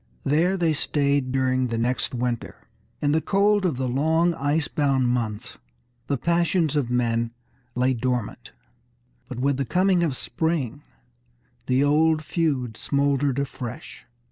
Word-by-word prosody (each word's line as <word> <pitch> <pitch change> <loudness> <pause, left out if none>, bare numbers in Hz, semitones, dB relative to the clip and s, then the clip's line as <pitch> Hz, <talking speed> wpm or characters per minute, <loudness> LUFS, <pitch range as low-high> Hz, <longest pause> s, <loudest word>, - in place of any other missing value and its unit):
There 170 +7 +2
they 165 -3 +2
stayed 140 -2 0
during 130 -1 +1
the 115 -1 -3
next 125 +2 -1
winter. 120 -1 -4 0.4
In 145 - +3
the 160 +1 +2
cold 200 +1 +2
of 150 -8 -2
the 130 0 -1
long 160 +7 +2
ice 145 +1 0
bound 135 -4 +1
months, 115 -4 -3 0.5
the 140 - 0
passions 170 0 +1
of 140 -5 0
men 115 -1 0 0.5
lay 125 +1 +2
dormant. 125 -2 -3 0.8
But 125 - -6
with 140 +1 +1
the 135 - 0
coming 180 - +2
of 160 -6 0
spring 150 -5 -2 0.9
the 130 +2 +3
old 155 +1 +3
feud 140 -9 -1
smouldered 140 -1 0
afresh. 130 -3 -6
140 Hz, 140 wpm, -24 LUFS, 125-160 Hz, 0.9 s, In